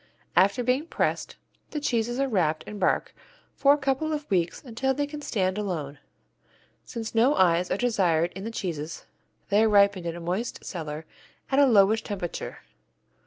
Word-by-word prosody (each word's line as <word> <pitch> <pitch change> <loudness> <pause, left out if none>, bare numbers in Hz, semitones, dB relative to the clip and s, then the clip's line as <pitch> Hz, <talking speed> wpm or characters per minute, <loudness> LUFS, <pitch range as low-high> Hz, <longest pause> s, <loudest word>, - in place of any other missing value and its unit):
After 200 +8 +4
being 255 +6 +1
pressed, - - -1 0.3
the 300 - -3
cheeses 240 -3 -1
are 275 - +2
wrapped 170 -10 +1
in 210 - -8
bark 185 - +1 0.4
for 280 - +4
a 290 - +5
couple 280 +2 -1
of 300 -1 -4
weeks 175 -3 0
until 265 +1 -1
they 290 - 0
can 295 +1 -8
stand 190 -7 -1
alone. 155 -9 -4 0.8
Since 230 -2 -6
no 240 +6 +4
eyes 180 -1 +3
are - - 0
desired 180 -8 +2
in 190 - -6
the 225 - -3
cheeses, 165 -8 -5 0.4
they 205 +1 +4
are 220 - +4
ripened 200 -3 +4
in 165 - -3
a - - -7
moist 180 +8 -3
cellar 155 -3 -5 0.5
at 270 - +3
a 285 - +6
lowish 215 -1 +5
temperature. 185 -5 -5
205 Hz, 170 wpm, -26 LUFS, 175-255 Hz, 0.8 s, a